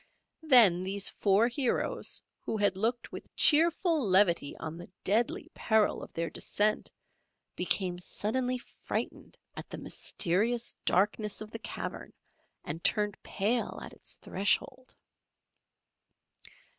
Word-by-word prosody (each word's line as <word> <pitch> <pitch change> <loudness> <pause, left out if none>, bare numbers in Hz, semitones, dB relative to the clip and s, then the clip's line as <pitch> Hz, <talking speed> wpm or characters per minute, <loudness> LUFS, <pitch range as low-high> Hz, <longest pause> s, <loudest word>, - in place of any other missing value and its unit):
Then 230 - +6
these 195 +1 0
four 205 +3 +2
heroes 265 - 0 0.2
who 220 - -4
had 205 -2 +2
looked 230 +5 -2
with - - -10
cheerful 330 0 +4
levity 185 -7 +3
on 160 0 -6
the 175 - -10
deadly 225 +5 0
peril 220 -2 +1
of - - -10
their 165 0 -2
descent 210 +1 -1 0.6
became 180 0 0
suddenly 250 +7 -2
frightened 245 - -6 0.2
at - - -8
the - - -7
mysterious 225 +7 0
darkness 210 +3 +1
of 215 0 -8
the 225 - -7
cavern - - -6 0.5
and 165 +3 -6
turned 210 -2 +1
pale 220 +5 -1
at - - -9
its - - -7
threshold. 210 +6 -1
210 Hz, 120 wpm, -30 LUFS, 185-240 Hz, 0.6 s, Then